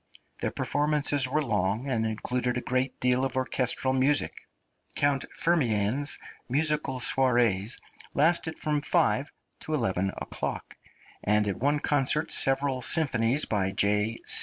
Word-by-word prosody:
The - - -1
performances 145 -2 +1
were 150 +4 0
long, 105 +1 -1
and 115 -4 0
included 125 +3 -2
a - - -2
great 130 +1 -2
deal 125 +1 +1
of 135 - -2
orchestral 130 0 0
music. 135 +3 +2 0.6
Count 140 -1 +1
Firmian's 135 -4 +1 0.3
musical 150 -1 +1
soirées 120 -5 +2 0.4
lasted 160 +1 +1
from 150 -1 -1
five 150 -3 +1 0.3
to 155 - -3
eleven 95 -7 0
o'clock, - - -5 0.5
and 105 0 +2
at 100 - -1
one 145 +4 +1
concert 145 +1 +1
several 135 -1 +2
symphonies 135 -2 +1
by 95 -3 -1
J. 105 +3 +1
130 Hz, 125 wpm, -27 LUFS, 115-145 Hz, 0.6 s, music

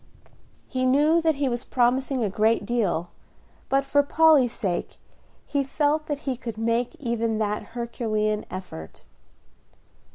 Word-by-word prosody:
He 255 0 -2
knew 295 +6 +4
that 320 -2 +2
he 280 0 0
was 240 -1 -2
promising 255 +1 +1
a 210 - 0
great 220 +3 +2
deal, 195 -8 -1 0.6
but 275 0 +2
for 285 +1 +3
Polly's 290 -4 +4
sake 185 -7 -3 0.5
he 280 -1 0
felt 300 +2 0
that 290 -1 -3
he 265 -2 0
could 230 -3 -7
make 230 +2 0
even 230 -3 -1
that 210 -1 -1 0.2
Herculean 215 -3 -1
effort. 180 - -8
240 Hz, 135 wpm, -25 LUFS, 220-280 Hz, 0.6 s, knew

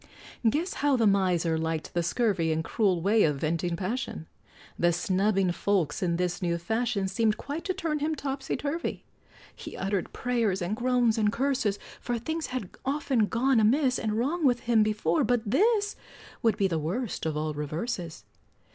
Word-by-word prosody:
Guess 320 - -1
how 285 -1 +3
the 230 - +3
miser 180 -5 +2
liked 160 -1 -3
the 175 - +1
scurvy 175 -3 +1
And 160 0 0
cruel 185 -4 +1
way 210 +3 +4
of 150 -5 +3
venting 165 +4 -1
passion; 195 -1 -3 0.5
The 175 0 +4
snubbing 195 +1 +1
folks 175 -5 0
in 175 -2 +1
this 180 +1 -1
new 170 -1 0
fashion 220 +3 -1
Seemed 210 +2 +1
quite 290 +4 -5
to 370 - 0
turn 325 -5 -1
him 310 +2 0
topsy 270 -1 -3
turvy; 305 +4 -3 0.5
He - - -9
uttered 195 -1 -2
prayers, 230 -6 0
and 180 +3 -2
groans, 245 -2 +2
and 210 -1 +3
curses, 255 -5 0 0.2
For 240 -1 -2
things 315 +8 -3
had 250 -8 -5
often 270 -5 +1
gone 250 +2 +2
amiss 255 +4 +3
And 215 -2 -1
wrong 300 +9 0
with 245 -4 +3
him 230 -2 +3
before, 210 -6 +1
but 245 -2 +1
this 415 - +2 0.5
Would 225 -3 +2
be 200 -2 +3
the 165 -4 -1
worst 180 +4 -3
of 155 -1 -2
all 155 0 -1
reverses! 165 - -4
215 Hz, 175 wpm, -28 LUFS, 175-255 Hz, 0.5 s, way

